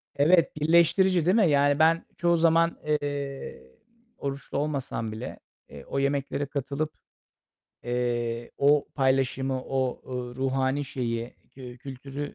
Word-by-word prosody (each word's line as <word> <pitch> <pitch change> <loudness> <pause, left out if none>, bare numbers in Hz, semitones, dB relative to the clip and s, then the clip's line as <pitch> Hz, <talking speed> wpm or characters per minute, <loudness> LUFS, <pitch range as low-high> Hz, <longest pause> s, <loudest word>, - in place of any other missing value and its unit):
Evet, 165 +4 +4
birleştirici, 170 +3 +4
değil 185 +4 +4
mi? 200 -8 +4
Yani, 145 0 +3
ben 165 +1 +4
çoğu 170 0 +3
zaman, 165 0 +3
eee, 140 - -3 0.5
oruçlu 140 -1 -4
olmasam 140 -6 -2
bile, 110 +4 -7 0.3
eee, 70 -1 -11
o 135 - -2
yemeklere 140 0 -1
katılıp, 145 +2 -3 0.9
eee, 120 -1 -2
o 145 +1 +4
paylaşımı, 130 -1 +1
o, 130 -2 -2
ııı, 125 -1 -5
ruhani 135 +2 0
şeyi, 115 -2 -4 0.2
kü 125 -2 -11
kültürü 135 +2 -7
140 Hz, 120 wpm, -27 LUFS, 130-150 Hz, 0.9 s, Evet